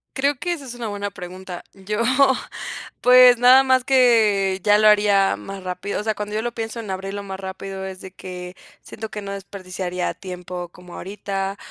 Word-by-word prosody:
Creo 280 0 +1
que 350 0 -1
esa 295 -5 -7
es 250 -2 -7
una 235 -2 -5
buena 205 0 -4
pregunta. 180 0 -8
Yo, 210 +3 -3 1.0
pues, 250 -1 +8
nada 255 +2 +7
más 260 -1 +3
que 220 -7 +3
ya 205 0 +5
lo 215 0 +5
haría 205 - +4
más 190 - -8
rápido, 180 +3 -3
o - - -4
sea, 220 -1 0
cuando 210 0 -5
yo 220 - 0
lo 240 +1 -3
pienso 225 +1 -5
en 215 - -7
abrirlo 195 +1 -4
más 195 -1 -6
rápido, 190 0 -6
es 190 -1 -7
de 190 - -10
que 180 -1 -8 0.3
siento 220 -1 -8
que 210 - -5
no 200 0 -5
desperdiciaría 185 -2 -4
tiempo 180 -1 -7
como 180 0 -14
ahorita, 195 0 -4
200 Hz, 190 wpm, -22 LUFS, 190-225 Hz, 1.0 s, pues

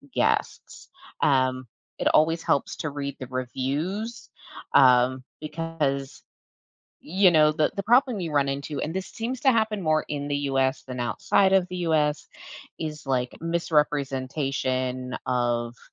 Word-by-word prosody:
guests. - - -1 0.3
Um, 130 -2 +2 0.3
it - - 0
always 165 +2 +3
helps 140 - 0
to 160 - -3
read 140 -1 -5
the 130 - -6
reviews, 150 - -3 0.4
um, 130 0 +5 0.2
because, 150 -3 -3 0.8
you 185 +2 +3
know, 155 -1 +5
the 155 0 +1
the 200 - -3
problem 240 0 +3
you 165 -3 -3
run 140 -1 +2
into 140 +1 -4
and 160 - -3
this 190 0 -3
seems 240 +3 -4
to 265 - +5
happen 220 -3 0
more 155 -1 +1
in 145 -1 -3
the 145 0 -1
US 135 0 +1
than 125 -1 -7
outside 190 +10 +2
of 185 -2 +3
the 180 - -5
US, 150 -2 +1 0.5
is 150 -2 -5
like 125 -2 -1
misrepresentation 135 -5 -1
of 120 -1 -1
145 Hz, 140 wpm, -25 LUFS, 130-165 Hz, 0.8 s, um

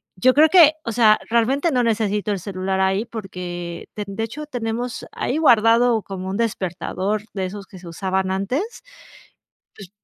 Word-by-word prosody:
Yo 255 +7 +3
creo 305 +2 +7
que, 320 -2 +7
o 230 - -2
sea, 220 -2 +4
realmente 260 +8 +1
no 250 -3 +2
necesito 210 -2 0
el 200 - -1
celular 190 0 -3
ahí, 190 +2 +1
porque 180 -6 -7
ten 210 - -4
de 225 - -2
hecho, 295 +7 -6
tenemos 240 -3 -4
ahí 265 - -2
guardado 230 -5 +4
como 190 -1 -6
un 195 - -3
despertador 200 -1 -2
de 190 -2 -2
esos 200 +2 -7
que 190 -1 -13
se 175 - -12
usaban 190 +2 -2
antes, 250 - -3 0.9
pues 195 -3 -12
215 Hz, 165 wpm, -21 LUFS, 190-240 Hz, 0.9 s, creo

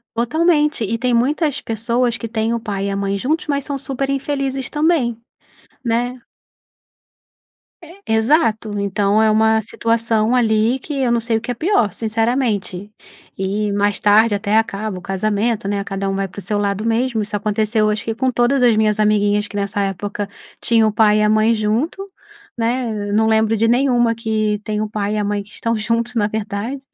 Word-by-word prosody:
Totalmente, 300 +1 +1
e 230 +3 -2
tem 250 +1 0
muitas 285 +5 +1
pessoas 235 +2 -1
que - - -6
têm 225 0 -1
o 235 - -1
pai 200 -3 -3
e - - -1
a 195 - -2
mãe 200 0 -1
juntos, 305 +10 -1
mas 280 -1 -1
são 285 -2 -3
super 270 0 -2
infelizes 275 -1 -2
também, 295 -7 +1 0.7
né. 245 +2 -1 1.9
Exato, 220 -3 +1
então 200 +1 +1
é 220 - +4
uma 220 +1 +3
situação 230 +1 0
ali 225 +1 +2
que 295 - -7
eu 245 -2 +1
não 235 - +2
sei 230 -1 0
o - - -5
que 235 - -4
é - - -1
pior, 245 - +1
sinceramente, 220 -2 -1 0.5
e 200 +2 -1
mais 205 0 +1
tarde 210 +1 +4
até 205 +1 +1
acaba 215 -2 -1
o - - -8
casamento, 205 +3 -1
né, 200 0 -1
cada 195 0 -3
um 195 - -2
vai 195 0 -1
pro 200 +2 -9
seu 210 +1 -2
lado 205 +1 -1
mesmo. 230 0 0
Isso 205 0 -4
aconteceu 215 +1 +1
acho 210 0 -2
que 225 - -2
com 260 +2 0
todas 250 +2 +2
as 235 -2 +5
minhas 215 -1 +2
amiguinhas 210 -1 +2
que 205 - -11
nessa 200 +1 -1
época 200 +1 -3 0.4
tinham 225 -2 +3
o - - -6
pai 210 -1 +4
e - - +2
a 210 - +3
mãe 215 +1 +3
junto, 230 - -1 0.5
né, 230 -3 -1
eu - - -2
não 220 +1 +3
lembro 220 0 +2
de 225 +2 +2
nenhuma 240 -1 +2
que 215 -2 -1
tem 210 0 -2
o 215 - -2
pai 210 0 -2
e - - -1
a 210 - 0
mãe 205 0 -2
que 205 - -21
estão 230 0 -2
juntos, 230 +3 -1
na 210 -3 +2
verdade 215 +4 -4
220 Hz, 190 wpm, -19 LUFS, 205-240 Hz, 1.9 s, as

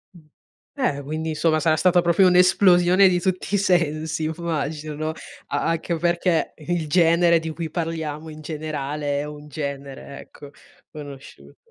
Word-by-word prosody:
Mh, - - -14 0.5
beh, 250 - -1
quindi 155 +3 -4
insomma 155 0 +1
sarà 155 +1 +2
stata 175 +3 +3
proprio 170 +2 +4
un'esplosione 180 0 +5
di 180 -1 +2
tutti 185 +2 -2
i - - +4
sensi 160 -5 0
immagino, 155 -1 -3 0.4
a - - -2
anche 165 +1 -2
perché 170 0 0
il 165 0 -3
genere 170 +1 +4
di 160 0 -5
cui 160 0 -5
parliamo 160 -2 -4
in 155 0 -10
generale 150 -2 -3
è - - -2
un 150 0 -10
genere, 140 -1 -7
ecco, 145 -1 -13 0.4
conosciuto. 145 -3 -11
160 Hz, 145 wpm, -23 LUFS, 150-175 Hz, 0.5 s, un'esplosione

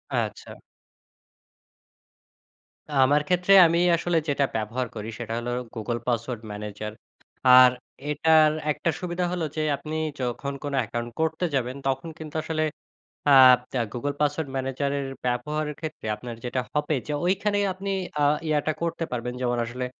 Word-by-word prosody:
আচ্ছা। - - -3 2.4
আমার 140 +2 +4
ক্ষেত্রে 180 +2 +3
আমি 170 +1 +1 0.2
আসলে 170 0 0
যেটা 140 0 +2
ব্যবহার 115 +3 -2
করি, 110 0 -5
সেটা 115 -1 -4
হলো 120 +1 -4 0.2
Google 115 +1 -3
পাসওয়ার্ড 120 -1 -1
ম্যানেজার। 105 +1 -6 0.6
আর 130 0 +9 0.4
এটার 155 0 +5 0.2
১ - - -3
টা - - +4
সুবিধা 180 0 -2
হল 180 -1 -2
যে, 155 - -1 0.2
আপনি 155 +2 -6 0.3
যখন 130 +3 -3
কোনো 145 -1 -2
অ্যাকাউন্ট 120 +1 -4
করতে 160 +2 0
যাবেন, 125 0 -1
তখন 135 +5 -1
কিন্তু 155 -1 -9
আসলে 155 -1 -1 0.7
আ - - +8 0.6
Google 145 +4 -3
পাসওয়ার্ড 145 0 0
ম্যানেজারের 135 +1 -2 0.2
ব্যবহারের 150 +5 -1
ক্ষেত্রে 155 -7 -7
আপনার 120 0 -8
যেটা 125 +1 -1
হবে, 150 +1 0
যে 150 - -2
ঐখানেই 205 +2 +1
আপনি 195 +2 -6 0.3
আ - - +4 0.2
ইয়াটা 155 0 +1
করতে 170 0 -2
পারবেন। 125 0 -3
যেমন, 120 -1 0
আসলে 125 +2 -4
140 Hz, 140 wpm, -25 LUFS, 120-160 Hz, 2.4 s, আর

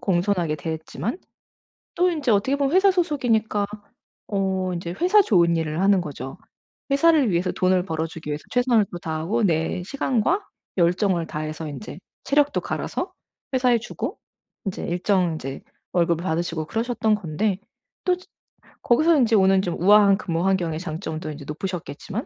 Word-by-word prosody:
공손하게 175 -4 +1
대했지만 160 - -4 0.8
또 360 0 +3
인제 300 -8 0
어떻게 215 +7 +2
보면 280 +1 0
회사 380 +2 +6
소속이니까 245 - +1 0.6
어 190 -2 -1
인제 170 0 -4
회사 390 +4 +6
좋은 170 - +3
일을 160 +1 -2
하는 195 0 +4
거죠. 140 -3 -6 0.5
회사를 280 -4 +4
위해서 175 +1 +1
돈을 185 0 +2
벌어주기 160 -2 -4
위해서 150 0 -3
최선을 245 -3 +3
또 - - -3
다하고 165 +8 -1
내 170 0 0
시간과 270 - 0 0.4
열정을 175 0 +2
다해서 155 +1 -5
인제 145 +1 -8 0.2
체력도 290 +1 +2
갈아서 - - -3 0.4
회사에 250 -2 +3
주고 230 - -5 0.5
인제 195 - -3
일정 180 -1 +1
이제 135 -2 -6 0.3
월급을 170 -1 +1
받으시고 165 -2 -1
그러셨던 225 0 0
건데 190 +2 -1 0.5
또 365 - +3
즈 365 - -16 0.6
거기서 310 +7 +4
인제 235 -4 +3
오는 190 -1 +5
좀 175 -3 -2
우아한 200 +1 +6
근무 170 -3 -2
환경의 175 -5 +1
장점도 160 -2 -5
인제 145 0 -8
높으셨겠지만 180 - -5
190 Hz, 350 characters per minute, -23 LUFS, 165-235 Hz, 0.8 s, 회사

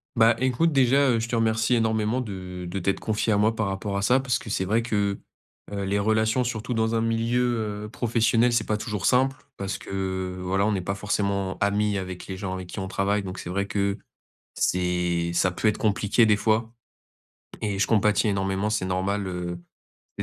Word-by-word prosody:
Bah, 115 0 +5
écoute, 130 +6 +2
déjà, 135 0 +4
heu, 115 - +2
je 115 +1 -3
te 120 - -1
remercie 115 +1 +2
énormément 110 +1 +1
de 90 -4 -6
de 95 +3 -3
t'être 95 +2 0
confiée 110 0 0
à 100 - +2
moi 110 +2 +2
par 110 -2 -1
rapport 100 +1 -3
à - - -1
ça. 125 +6 +4
Parce 125 -3 0
que, 110 - -9
c'est 95 - -1
vrai 110 +4 +2
que, 100 -4 -1 0.5
heu, 100 -1 -3
les 100 +1 0
relations 110 +3 +2
surtout 120 +1 -3
dans 115 0 +1
un 115 - +2
milieu, 115 -2 0
heu, - - -8
professionnel, 115 0 +2
c'est 120 -2 +2
pas 105 - 0
toujours 105 -4 -4
simple. 130 +1 +3 0.2
Parce 95 -1 -3
que, 95 -1 -4
voilà, 95 +2 +1
on 110 - +2
n'est 95 -3 0
pas 95 +2 -3
forcément 100 -1 -1
amis 100 0 +1
avec 90 -1 -6
les 95 - -5
gens 95 0 -4
avec 95 -1 -6
qui 90 - -7
on 95 - -3
travaille. 100 +2 0
Donc, 95 0 -6
c'est 85 - -6
vrai 100 +2 -1
que, 100 0 -1 0.5
c'est 90 -1 0
ça 90 +2 +2
peut 90 +5 -1
être 105 - +2
compliqué, 105 +2 +2
des 105 -2 +4
fois 110 +1 +1 0.9
et 100 -2 -1
je 100 - +2
compatis, 105 -1 +3
énormément. 95 +1 0
C'est 105 -3 -1
normal, 95 +2 -1
heu, 90 -1 -4 0.6
il - - -1
105 Hz, 210 wpm, -25 LUFS, 95-115 Hz, 0.9 s, Bah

